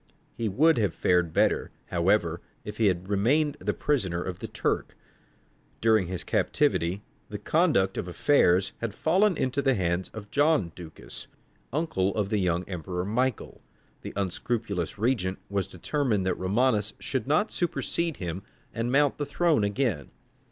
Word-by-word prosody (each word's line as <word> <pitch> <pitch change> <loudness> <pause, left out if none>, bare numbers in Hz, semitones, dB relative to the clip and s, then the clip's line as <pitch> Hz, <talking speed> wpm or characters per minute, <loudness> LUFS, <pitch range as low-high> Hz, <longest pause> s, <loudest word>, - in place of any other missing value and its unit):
He 115 -2 -2
would 150 +7 +4
have 100 -7 0
fared 90 -2 +2
better, - - +2 0.2
however, - - +1 0.2
if 105 0 -6
he 110 - +3
had 90 -1 0
remained 140 +10 +2
the - - -1
prisoner 100 -13 0
of 90 0 -5
the - - -5
Turk. - - -2 0.8
During 110 -5 +3
his 90 -2 -4
captivity 90 +5 +1 0.3
the - - -4
conduct 95 0 +2
of - - -4
affairs 95 -2 +3
had 115 -3 -4
fallen 185 +5 +2
into 130 +2 0
the 135 -2 +2
hands 90 -1 -1
of 105 -2 -10
John 145 - +2
Ducas, 85 -3 -7 0.4
uncle 125 - 0
of 105 -2 0
the 105 -1 +1
young 90 -1 0
emperor 90 0 -4
Michael. 125 +3 -1 0.4
The - - -7
unscrupulous 100 -1 -2
regent 100 -5 0
was 100 -3 0
determined 110 - -1
that 95 - +2
Romanus 105 +2 +1
should 130 -1 -2
not 155 +10 +2
supersede 170 -2 -1
him 90 0 -4 0.3
and 115 +2 -2
mount 145 +1 +3
the 145 - -1
throne 155 -4 +2
again. 100 - -1
105 Hz, 150 wpm, -27 LUFS, 95-135 Hz, 0.8 s, would